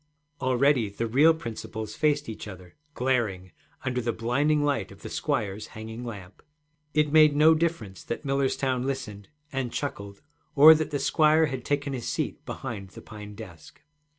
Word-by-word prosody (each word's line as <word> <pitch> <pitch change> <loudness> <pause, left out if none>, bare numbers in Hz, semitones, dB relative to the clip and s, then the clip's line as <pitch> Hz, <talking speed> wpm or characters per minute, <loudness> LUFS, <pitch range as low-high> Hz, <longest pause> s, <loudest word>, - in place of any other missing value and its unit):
Already 130 -3 +2
the 100 +4 -3
real 140 +8 +5
principals 110 -5 -6
faced 150 0 +1
each 110 -1 -7
other, 90 -3 -11 0.2
glaring, 110 -8 -1 0.3
under 125 -1 -1
the 120 0 -1
blinding 145 +7 +1
light 140 -10 -1
of 100 - -15
the - - -7
squire's 110 -8 -2
hanging 110 +2 -7
lamp. 100 -5 -9 0.5
It 150 -1 +2
made 155 -2 +6
no 155 +2 +6
difference 155 - -2
that 115 - -5
Millerstown 135 -2 0
listened 105 -7 -5 0.2
and 135 -4 -2
chuckled 100 -8 -5 0.3
or 155 +2 +10
that 155 0 -1
the 145 - -1
squire 155 +2 +3
had 130 -4 -4
taken 140 0 -1
his 125 -3 -4
seat - - -3
behind 105 -7 -6
the - - -12
pine 105 -1 -10
desk. 90 -8 -12
125 Hz, 160 wpm, -27 LUFS, 105-145 Hz, 0.5 s, or